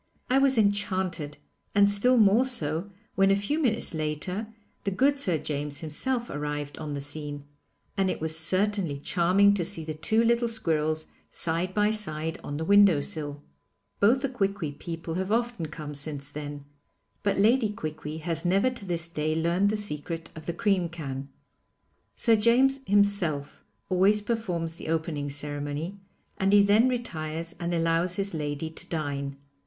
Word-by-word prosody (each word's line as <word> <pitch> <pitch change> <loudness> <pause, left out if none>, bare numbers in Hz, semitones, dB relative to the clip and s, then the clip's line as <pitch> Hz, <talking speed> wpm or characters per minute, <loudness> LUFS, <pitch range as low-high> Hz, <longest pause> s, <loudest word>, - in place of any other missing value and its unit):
I 265 - +5
was 270 -2 +3
enchanted, 190 -7 0 0.4
and 200 0 +6
still 205 +6 +3
more 215 +2 +5
so 175 - 0 0.2
when 195 0 +4
a 195 - +5
few 200 +10 -1
minutes 230 - +2
later 160 +7 -3 0.4
the - - 0
good 275 +9 +2
Sir 180 - +2
James 145 -1 -4
himself 240 - -2
arrived 145 0 -4
on 150 -2 -4
the 140 - -4
scene, 145 0 -4 0.5
and 195 -1 +1
it - - -2
was 160 0 -1
certainly 185 -1 0
charming 185 +7 +3
to 195 -3 0
see 170 -2 -3
the 155 - -3
two 220 +9 +2
little 235 +1 +3
squirrels 155 -8 0 0.2
side 170 +3 -2
by 210 0 +3
side 160 -7 -1
on 145 - -4
the 160 - -3
window 200 -4 +6
sill. 145 0 -3 0.6
Both 235 +6 +4
the 275 - +1
Quiqui 195 - -1
people 165 +2 -6
have 190 +3 -2
often 235 -6 0
come 150 -1 -7
since 145 -1 -3
then, 145 -1 -7 0.6
but 200 0 0
Lady 220 +3 +4
Quiqui 155 -6 -5
has 165 0 -2
never 195 +8 +3
to 240 -5 -7
this 170 -3 0
day 155 -1 -1
learned 170 +5 +2
the 215 - 0
secret 165 -4 -3
of 155 -1 -10
the - - +1
cream 185 -1 +1
can. 140 -5 -6 0.9
Sir 230 -2 +4
James 250 +5 +4
himself 195 -8 +1 0.2
always 195 +3 +4
performs 180 -8 -2
the - - -8
opening 160 -3 -1
ceremony, 145 +5 -3 0.4
and 195 +1 +2
he 205 -1 +7
then 215 +5 +5
retires 165 -9 -3
and 170 0 -2
allows 165 +1 +1
his 200 0 -2
lady 150 0 -3
to - - -9
dine. 140 -3 -3
170 Hz, 165 wpm, -27 LUFS, 155-205 Hz, 0.9 s, he